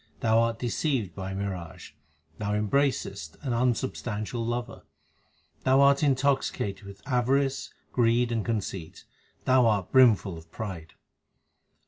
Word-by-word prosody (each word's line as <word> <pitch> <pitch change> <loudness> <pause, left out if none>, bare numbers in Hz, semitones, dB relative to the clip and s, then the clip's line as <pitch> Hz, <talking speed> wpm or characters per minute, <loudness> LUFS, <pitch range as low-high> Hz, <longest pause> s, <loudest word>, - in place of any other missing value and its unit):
Thou 110 0 +4
art 115 0 +1
deceived 120 - -1
by 95 -1 -5
a 95 - -4
mirage; 95 -4 -5 0.5
thou 105 -1 -1
embracest 105 - -1
an 130 -4 -1
un 120 0 +2
substantial 115 -2 -4
lover; 120 +1 -3 0.8
Thou 130 +1 +4
art 140 0 +5
intoxicated 135 -8 0
with 100 0 -12
avarice, 135 +1 +1 0.2
greed, 120 0 +2
and 115 -2 0
conceit; 95 -7 -4 0.4
thou 130 -2 +5
art 100 -4 0
brimful 110 -9 +4
of 80 0 -18
pride. 90 -8 -6
115 Hz, 125 wpm, -27 LUFS, 100-130 Hz, 0.8 s, art